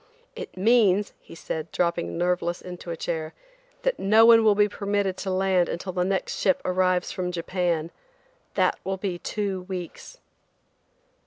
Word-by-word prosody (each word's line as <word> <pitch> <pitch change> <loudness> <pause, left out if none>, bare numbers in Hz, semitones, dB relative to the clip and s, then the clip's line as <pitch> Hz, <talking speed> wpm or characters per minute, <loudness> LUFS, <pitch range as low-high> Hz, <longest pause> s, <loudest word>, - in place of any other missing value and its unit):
"It 475 - -8
means," 210 -1 +3
he - - -14
said, 160 -1 -5
dropping 170 -1 -1
nerveless 175 0 0
into 180 -1 -9
a 165 - -4
chair, 160 -1 -4 0.5
"that - - 0
no 215 +3 +5
one 230 -1 +7
will 215 -2 +5
be 205 0 +4
permitted 200 -2 -1
to 195 - -4
land 185 -1 +2
until 185 +2 -4
the 180 -1 0
next 190 +1 -2
ship 190 - +2
arrives 185 0 +1
from 180 -1 -3
Japan. 170 -2 -1 0.6
That - - +2
will 190 0 -2
be 185 -2 -3
two 200 -2 -3
weeks." 180 -3 -7
185 Hz, 155 wpm, -25 LUFS, 175-200 Hz, 0.6 s, one